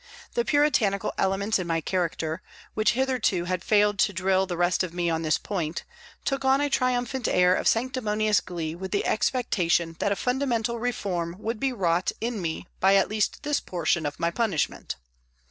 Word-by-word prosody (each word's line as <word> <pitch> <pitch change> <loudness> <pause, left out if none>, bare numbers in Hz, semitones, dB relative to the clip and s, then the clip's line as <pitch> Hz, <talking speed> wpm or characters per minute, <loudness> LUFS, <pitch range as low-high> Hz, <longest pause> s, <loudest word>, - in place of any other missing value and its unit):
The 475 - +1
puritanical 270 - +2
elements 195 +2 +1
in 180 - -3
my 165 -1 +1
character, 165 -2 -2 0.3
which 215 +2 +2
hitherto 250 -8 +1
had 180 0 -2
failed 210 -1 +3
to 205 - +3
drill 190 +1 +1
the 175 -2 -3
rest 175 +1 +2
of 180 -2 -3
me 175 -1 0
on 160 0 -1
this 155 -2 +2
point, 170 -5 -3 0.4
took 275 -1 -1
on 265 +1 +4
a 290 0 0
triumphant 255 -1 0
air 180 0 +4
of - - 0
sanctimonious 215 -4 +1
glee 165 -3 -4
with 190 +3 -6
the 200 - -1
expectation 175 -9 +1
that 200 - +1
a - - +2
fundamental 240 -1 -1
reform 185 -8 -2
would 220 +2 -4
be 270 -1 +1
wrought 180 -6 +1
in 230 -3 -2
me 165 +1 -3
by 195 +1 +5
at 195 - +3
least 215 +4 -1
this 295 -1 +1
portion 170 -3 -1
of 145 - -6
my 170 0 +1
punishment. 195 -5 -1
200 Hz, 180 wpm, -26 LUFS, 175-240 Hz, 0.4 s, by